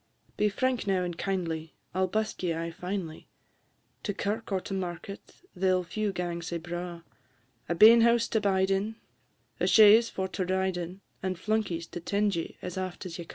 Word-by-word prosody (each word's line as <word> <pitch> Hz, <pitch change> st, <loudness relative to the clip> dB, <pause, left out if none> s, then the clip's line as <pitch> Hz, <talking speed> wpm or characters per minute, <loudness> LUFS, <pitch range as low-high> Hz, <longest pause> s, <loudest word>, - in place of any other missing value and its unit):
Be 210 Hz, -, +2 dB
frank 250 Hz, +2 st, -1 dB
now 190 Hz, -2 st, +2 dB
and 175 Hz, -1 st, -3 dB
kindly; 165 Hz, -4 st, -3 dB, 0.2 s
I 185 Hz, -, -2 dB
'll 190 Hz, -, +3 dB
busk 215 Hz, +3 st, -2 dB
ye 175 Hz, -3 st, 0 dB
aye 165 Hz, +1 st, -3 dB
finely; 180 Hz, -2 st, -5 dB, 0.7 s
To 205 Hz, -, -3 dB
kirk 215 Hz, +2 st, -3 dB
or 190 Hz, -, +1 dB
to 195 Hz, -, -6 dB
market 190 Hz, -, -6 dB
they 185 Hz, +1 st, +2 dB
'll 185 Hz, 0 st, +2 dB
few 210 Hz, +4 st, -2 dB
gang 175 Hz, -2 st, -3 dB
sae 170 Hz, 0 st, -3 dB
braw; 175 Hz, 0 st, -6 dB, 0.7 s
A 170 Hz, -, +1 dB
bein 225 Hz, +6 st, +9 dB
house 235 Hz, 0 st, +4 dB
to 220 Hz, -, +1 dB
bide 190 Hz, -1 st, +2 dB
in, 205 Hz, +3 st, 0 dB, 0.6 s
a -, -, +1 dB
chaise 220 Hz, +2 st, +7 dB
for 190 Hz, 0 st, -3 dB
to 185 Hz, -, -2 dB
ride 190 Hz, 0 st, 0 dB
in, 175 Hz, +2 st, -6 dB, 0.2 s
And 185 Hz, -1 st, -2 dB
flunkies 200 Hz, -5 st, -1 dB
to -, -, -5 dB
'tend 200 Hz, +3 st, 0 dB
ye 165 Hz, -, -4 dB
as 180 Hz, +1 st, -4 dB
aft 185 Hz, +1 st, -5 dB
as 175 Hz, -1 st, -6 dB
ye 170 Hz, -, -6 dB
ca'." -, -, -29 dB
190 Hz, 200 wpm, -29 LUFS, 175-205 Hz, 0.7 s, bein